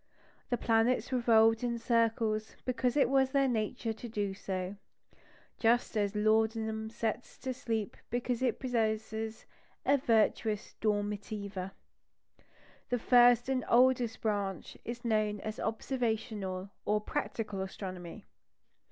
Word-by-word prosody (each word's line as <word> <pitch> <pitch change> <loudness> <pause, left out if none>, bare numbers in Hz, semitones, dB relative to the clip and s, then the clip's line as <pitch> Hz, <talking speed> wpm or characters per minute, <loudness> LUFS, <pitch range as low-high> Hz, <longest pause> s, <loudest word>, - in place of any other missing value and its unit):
The 245 - +1
planets 230 +2 +2
revolved 225 -2 +4
in 240 -1 0
circles 225 -2 +1
because 255 +1 0
it 285 - +5
was 265 0 +3
their 275 0 +3
nature 225 -1 -1
to 235 +2 -8
do 205 -3 -2
so, 190 0 -4 0.8
just 235 +1 +2
as 205 -1 0
laudanum 220 +1 +1
sets 230 +1 -3
to 260 -1 -3
sleep 225 -4 -3
because 245 0 -1
it 250 -3 +1
possesses 220 -2 -2 0.4
a 280 - +5
virtus 220 -2 +1
dormitiva. 205 -2 -2 1.2
This 245 -2 0
first 245 -1 +6
and 260 -2 0
oldest 245 -2 +4
branch 200 -4 -2
is 240 +1 -6
known 215 -2 +1
as 215 0 -5
"observational," 220 -5 -2
or 210 0 +2
"practical 210 -1 -3
astronomy." 190 0 -7
220 Hz, 115 wpm, -32 LUFS, 210-240 Hz, 1.2 s, first